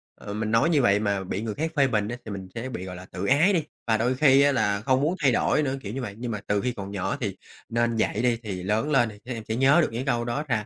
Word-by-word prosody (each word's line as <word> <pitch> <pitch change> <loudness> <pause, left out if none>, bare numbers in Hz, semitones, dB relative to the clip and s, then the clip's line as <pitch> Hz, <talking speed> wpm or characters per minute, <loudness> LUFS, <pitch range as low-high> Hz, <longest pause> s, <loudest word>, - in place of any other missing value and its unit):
ừ, 100 - -8
mình 110 +1 -2
nói 115 +8 +3
như 150 -5 +3
vậy 100 -3 +4
mà 100 -2 -1
bị 95 +2 -3
người 110 -2 -3
khác 160 +1 -2
phê 140 -2 +4
bình 105 -4 0
á, 120 +2 -4
thì 110 - -6
mình 95 -2 -6
sẽ 115 +3 -4
bị, 95 -7 -6
gọi 90 - -7
là, 90 +1 -10
tự 95 +1 -6
ái 155 - +4
đi, 165 - +1 0.2
và 110 -1 +3
đôi 120 +3 +1
khi 135 0 +5
á, 145 - +5
là 100 -6 +1
không 130 +1 +2
muốn 160 +5 +1
thay 135 - +5
đổi 150 +5 +2
nữa, 135 -1 -1
kiểu 105 +1 -6
như 135 - -3
vậy. 105 -5 -6
Nhưng 120 0 -4
mà 105 - -3
từ 105 -1 +1
khi 125 - -1
còn 100 -4 -7
nhỏ 95 -1 -2
thì 100 -4 -3 0.3
nên 115 0 +1
dạy 110 -1 0
đi, 120 -1 +2
thì 95 -4 -5
lớn 110 +10 0
lên 120 -5 +3
thì 105 - -12
các 125 - -7
em 115 -2 -6
sẽ 110 - -1
nhớ 135 +7 +5
được - - +1
những 120 +4 -4
câu 120 -3 0
đó 120 +6 -2
ra, 110 -4 0
115 Hz, 320 wpm, -25 LUFS, 105-135 Hz, 0.3 s, khi